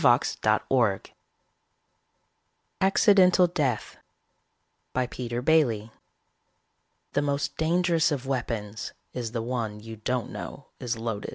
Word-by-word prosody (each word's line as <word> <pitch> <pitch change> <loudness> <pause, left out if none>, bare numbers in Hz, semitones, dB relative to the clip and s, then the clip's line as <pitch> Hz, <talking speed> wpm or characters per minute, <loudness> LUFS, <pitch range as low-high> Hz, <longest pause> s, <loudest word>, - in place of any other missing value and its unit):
net 110 0 +3 2.2
ACCIDENTAL 190 -2 +5
DEATH 145 -10 -1 1.0
BY 130 0 +2
PETER 120 -1 -4
BAILY 120 -9 +2 1.2
_The 145 - +1
most 140 0 -1
dangerous 165 0 +2
of 140 -3 -2
weapons 115 -5 -3 0.2
is 120 -3 -4
the 115 -1 -2
one 115 -3 -3
you 110 +1 -9
don't 125 +3 -2
know - - -7
is 120 -2 -2
loaded. 110 -2 -4
125 Hz, 100 wpm, -27 LUFS, 115-160 Hz, 2.2 s, ACCIDENTAL